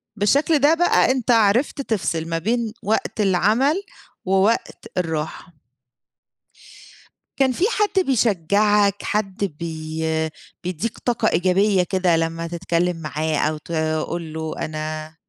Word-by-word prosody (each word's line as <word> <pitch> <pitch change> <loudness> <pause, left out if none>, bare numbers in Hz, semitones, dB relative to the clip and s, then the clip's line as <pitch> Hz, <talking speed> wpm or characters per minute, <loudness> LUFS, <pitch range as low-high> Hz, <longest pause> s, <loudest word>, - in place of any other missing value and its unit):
بالشكل 280 +9 +2
ده 290 +3 +5
بقى 335 -6 +3
أنت 255 -2 0
عرفت 230 +5 +3
تفصل 185 -9 -2
ما 165 - -1
بين 225 +4 -1
وقت 220 +1 -1
العمل، 220 - +2 0.4
ووقت 195 +4 +1
الراحة. 160 -1 -3 1.8
كان 265 -1 +3
فيه 340 +10 0
حد 410 -4 +1
بيشجعك 205 -3 +2
حد 205 -1 -2 0.2
بي 160 -1 -2 0.3
بيدّيك 185 +5 -3
طاقة 235 -2 0
إيجابية 185 +2 +2
كده 180 -2 +1
لمّا 165 +1 -2
تتكلّم 170 0 -1
معاه 155 0 -2
أو 155 +1 0
تقول 160 +1 -3
له 160 0 -4
أنا 155 0 -5
185 Hz, 115 wpm, -22 LUFS, 160-225 Hz, 1.8 s, ده